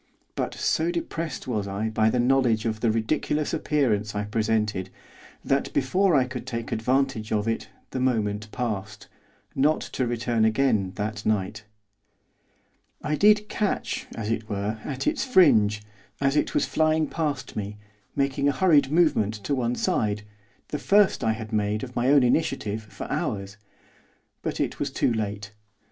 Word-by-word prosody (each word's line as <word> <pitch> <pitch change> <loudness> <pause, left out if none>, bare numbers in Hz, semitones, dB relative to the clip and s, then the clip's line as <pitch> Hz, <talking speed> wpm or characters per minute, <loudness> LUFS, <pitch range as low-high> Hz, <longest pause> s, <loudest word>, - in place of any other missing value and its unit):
But - - -3
so 160 +2 +1
depressed 170 -3 -4
was 105 -5 -1
I 100 +3 -2
by 110 0 +2
the 125 - 0
knowledge 120 -3 +2
of 110 -1 -1
the 115 - +2
ridiculous 130 +7 0
appearance 120 -10 0
I 105 - -1
presented 105 -3 -1 0.6
that, 135 0 +1
before 180 +7 +2
I 135 - +5
could 125 0 -7
take 115 -3 -4
advantage 125 -1 0
of 105 0 0
it 115 - -2 0.2
the 130 - -3
moment 105 -4 0
passed, 105 -4 -4 0.5
not 150 +3 +2
to 130 - -2
return 115 -1 0
again 110 -4 +2
that 105 0 -3
night. 105 0 -1 1.4
I 150 - -1
did 210 +4 +4
catch, 210 -1 -2
as 110 -1 -3
it 110 -1 -3
were, 105 +2 -2
at 135 -3 -4
its 300 -3 +1
fringe, 110 - +4 0.4
as 135 0 +1
it - - 0
was - - +3
flying 155 0 +2
past 150 -4 -3
me, 105 0 -4 0.4
making 140 0 +1
a - - +1
hurried 145 -2 +4
movement 155 -11 +3
to 140 - -1
one 125 -2 0
side, 105 -3 0 0.5
the 150 - -3
first 200 +5 +3
I 110 - +2
had 110 0 -7
made, 105 0 0
of 125 -1 -7
my 120 +1 +1
own 140 -2 +6
initiative, 120 -5 0
for 110 -1 -9
hours. 100 -1 -2 0.9
But - - -3
it - - -1
was - - -1
too 120 - +1
late. 105 -1 -4
115 Hz, 160 wpm, -25 LUFS, 105-140 Hz, 1.4 s, own